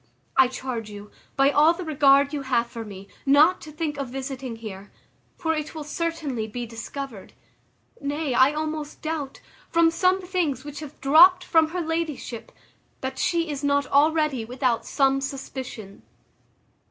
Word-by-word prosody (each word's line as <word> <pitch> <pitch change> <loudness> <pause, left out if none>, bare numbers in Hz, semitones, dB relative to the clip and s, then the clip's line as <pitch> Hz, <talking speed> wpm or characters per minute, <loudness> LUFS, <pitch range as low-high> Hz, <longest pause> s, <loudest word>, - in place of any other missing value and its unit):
I 265 - +6
charge 250 -4 -5
you, 205 0 -10 0.2
by 275 +1 +4
all 305 +3 +5
the 365 - -6
regard 280 -2 +4
you 290 - -2
have 250 -3 +1
for 235 -1 -7
me, 200 -2 -10 0.2
not 295 +6 +5
to 310 - -10
think 300 -2 -3
of 275 -3 -3
visiting 265 -1 -5
here; 205 -3 -9 0.5
for 320 -1 0
it 305 0 -4
will 310 - -5
certainly 300 -7 -3
be 240 +3 -5
discovered; 230 0 -8 0.7
nay, 285 0 -2
I 260 +3 +5
almost 305 -1 -4
doubt, 310 -4 -4 0.3
from 335 -1 +4
some 365 +3 +2
things 350 -8 -2
which 290 -1 -7
have 300 -2 -10
dropt 350 +7 +7
from 325 -2 +3
her 350 +3 -3
ladyship, 320 -7 -4 0.5
that 265 0 -4
she 335 -1 +1
is 285 0 -5
not 285 0 +2
already 300 -3 +2
without 245 0 -1
some 270 -1 +2
suspicion. 260 -6 -7
280 Hz, 155 wpm, -25 LUFS, 255-315 Hz, 0.7 s, dropt